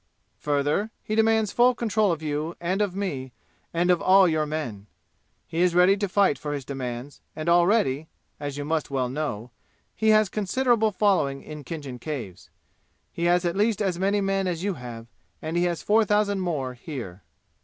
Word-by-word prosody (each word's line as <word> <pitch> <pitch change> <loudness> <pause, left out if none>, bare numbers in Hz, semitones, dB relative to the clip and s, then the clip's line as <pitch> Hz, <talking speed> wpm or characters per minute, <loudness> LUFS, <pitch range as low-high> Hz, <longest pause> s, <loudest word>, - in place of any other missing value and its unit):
Further, 145 +8 0
he 215 - -4
demands 220 -1 +3
full 245 +1 +4
control 215 -4 +1
of 160 -1 -3
you 150 +2 -2
and 185 +4 -1
of 200 -3 -1
me 135 -11 -4 0.4
and 175 +2 +2
of 175 - +2
all 190 0 +6
your 155 -2 0
men. 120 -10 -5 0.6
He 165 - -2
is 180 -1 +3
ready 180 +2 +6
to 200 -1 -2
fight 190 -8 +2
for 145 0 -4
his 140 -3 -5
demands 130 0 -6
and 155 +1 -5
already 170 -4 +3 0.3
as 145 -1 -5
you 145 - -4
must 160 0 -1
well 130 -3 -1
know 125 -5 -4 0.4
he 220 - +1
has 215 -1 +5
considerable 220 +3 +1
following 185 -9 +1
in 150 -1 -9
Khinjan 140 -4 -7
Caves. 125 - -6 0.6
He 170 - -2
has 175 +1 +3
at 170 - 0
least 210 +1 +1
as 190 -4 -1
many 200 +2 +1
men 195 -1 0
as 175 -1 -2
you 200 0 0
have, 120 -5 -8 0.3
and 160 +2 -4
he 175 +1 +2
has 175 -2 -2
four 220 +2 +4
thousand 205 -1 +1
more 150 -8 -2
here. 120 - -8
170 Hz, 185 wpm, -25 LUFS, 145-200 Hz, 0.6 s, all